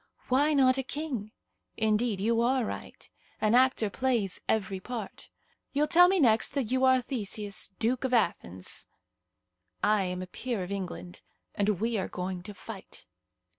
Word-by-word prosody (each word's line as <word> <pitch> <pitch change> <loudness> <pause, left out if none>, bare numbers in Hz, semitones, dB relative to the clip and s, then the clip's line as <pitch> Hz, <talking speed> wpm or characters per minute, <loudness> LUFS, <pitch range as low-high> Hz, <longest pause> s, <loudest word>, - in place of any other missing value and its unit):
"Why 290 +4 +3
not 265 -1 +4
a - - -1
king? 260 -7 -4 0.5
Indeed, 215 -1 +1
you 230 +3 +2
are 250 0 +2
right. - - -7 0.3
An 215 +1 +2
actor 255 -3 +4
plays 235 -7 0
every 195 -3 0
part. 225 0 -7 0.4
You'll 290 +2 +3
tell 350 +3 +7
me 380 0 +2
next 230 -1 +4
that 255 -5 -1
you 260 0 +2
are 260 -1 +4
Theseus, 210 -5 -3
Duke 245 +3 0
of 260 - -1
Athens." 130 - -1 1.0
"I 210 -2 +3
am 180 0 -3
a - - -5
peer 220 +2 -4
of 180 - -7
England, 185 -2 -5 0.3
and 205 -3 0
we 225 -1 0
are 190 - -2
going 180 0 -4
to 205 +3 -9
fight." 200 0 -10
225 Hz, 160 wpm, -29 LUFS, 200-260 Hz, 1.0 s, tell